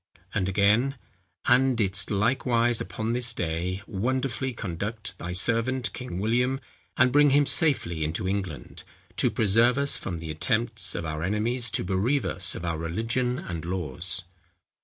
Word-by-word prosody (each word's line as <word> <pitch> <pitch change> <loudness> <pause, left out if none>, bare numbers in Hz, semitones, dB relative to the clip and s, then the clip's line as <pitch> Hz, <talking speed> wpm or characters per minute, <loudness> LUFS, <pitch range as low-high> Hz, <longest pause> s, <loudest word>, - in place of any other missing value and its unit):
And 95 -3 0
again, 105 +8 +3 0.5
"And 130 0 +4
didst 100 -2 +3
likewise 115 +2 +1
upon 110 +6 -3
this 120 -1 0
day, 90 +2 -3
wonderfully 130 +5 -1
conduct 105 +1 -5
thy 90 - -5
servant 115 +6 0
King 125 -8 -6
William, 125 +6 +1 0.4
and 130 0 +4
bring 145 +2 +5
him 145 +1 +4
safely 125 - +3
into 80 +4 -2
England, 95 -6 -4 0.4
to - - +3
preserve 115 +4 +3
us 140 0 +2
from 85 - -5
the 80 -1 -6
attempts 95 +4 0
of 85 - -3
our 75 -1 -4
enemies 110 +6 0
to - - -1
bereave 100 +10 0
us - - +2
of 85 - -6
our 85 -2 -2
religion 115 +9 -1
and 85 -8 -6
laws." 90 +1 -3
110 Hz, 150 wpm, -26 LUFS, 90-125 Hz, 0.5 s, bring